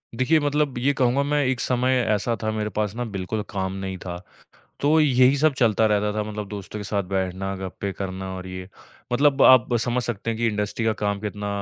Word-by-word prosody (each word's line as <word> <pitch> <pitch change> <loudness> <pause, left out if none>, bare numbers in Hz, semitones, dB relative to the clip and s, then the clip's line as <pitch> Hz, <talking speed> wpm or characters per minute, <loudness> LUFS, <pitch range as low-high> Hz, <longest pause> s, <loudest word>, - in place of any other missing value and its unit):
देखिए, 130 +7 +3
मतलब 145 -2 0
ये 140 +4 +2
कहूँगा 130 +1 +2
मैं, 145 0 +1
एक 130 -1 0
समय 125 +1 +1 0.2
ऐसा 110 +3 0
था, 110 - 0
मेरे 105 -1 -2
पास 105 0 -2
ना 120 - -2
बिल्कुल 95 +3 -2
काम 95 -2 -3
नहीं 95 -1 -4
था। 85 -1 -4 0.6
तो 155 +3 +3
यही 130 -2 +5
सब 155 +1 +3
चलता 110 -3 +3
रहता 105 0 +1
था, 105 0 -1
मतलब 105 -1 -5
दोस्तों 105 +1 -7
के - - -5
साथ 100 0 -1
बैठना, 95 0 -2
गप्पें 95 +1 -5
करना 95 -1 -5
और 95 0 -7
ये। 95 0 -7 0.5
मतलब 140 +1 +3
आप 130 -4 +7 0.2
समझ 125 +1 -1
सकते 115 -1 -3
हैं 115 - -2
कि 115 - +2
इंडस्ट्री 105 +1 -2
का 110 - +2
काम 100 -1 0
कितना 105 -1 -4
110 Hz, 210 wpm, -24 LUFS, 100-130 Hz, 0.6 s, आप